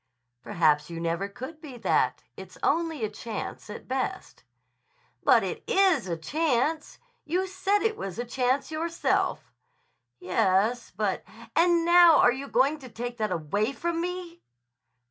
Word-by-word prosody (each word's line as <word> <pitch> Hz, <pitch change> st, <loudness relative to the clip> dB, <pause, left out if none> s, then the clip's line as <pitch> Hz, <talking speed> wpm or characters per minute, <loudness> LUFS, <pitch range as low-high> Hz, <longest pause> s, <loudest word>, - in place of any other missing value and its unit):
"Perhaps 155 Hz, -5 st, +1 dB
you 165 Hz, -1 st, -6 dB
never 170 Hz, +4 st, -1 dB
could 260 Hz, +10 st, -9 dB
be 275 Hz, -6 st, -9 dB
that. 160 Hz, -, +1 dB
It's 185 Hz, +3 st, -11 dB
only 320 Hz, -5 st, +1 dB
a -, -, -1 dB
chance 215 Hz, 0 st, -6 dB
at 210 Hz, -, -9 dB
best." 260 Hz, 0 st, -4 dB, 0.8 s
"But -, -, +5 dB
it -, -, -4 dB
is 370 Hz, -, +3 dB
a 170 Hz, -, -2 dB
chance. 305 Hz, -, -1 dB, 0.3 s
You 360 Hz, +5 st, -1 dB
said 385 Hz, +2 st, 0 dB
it 445 Hz, -1 st, +1 dB
was 190 Hz, -2 st, -6 dB
a 240 Hz, -, -3 dB
chance 255 Hz, +4 st, 0 dB
yourself." 330 Hz, +2 st, -1 dB, 0.7 s
"Yes; 190 Hz, +6 st, +1 dB
but—" 195 Hz, 0 st, -2 dB, 0.3 s
"And 340 Hz, -1 st, +4 dB
now 345 Hz, -2 st, +7 dB
are 245 Hz, -, +5 dB
you 275 Hz, +2 st, -6 dB
going 275 Hz, +5 st, +2 dB
to 260 Hz, -3 st, -11 dB
take 240 Hz, +1 st, -6 dB
that 215 Hz, -3 st, -1 dB
away 200 Hz, -, -1 dB
from 335 Hz, +2 st, -2 dB
me?" 355 Hz, -1 st, -5 dB
255 Hz, 145 wpm, -27 LUFS, 200-330 Hz, 0.8 s, now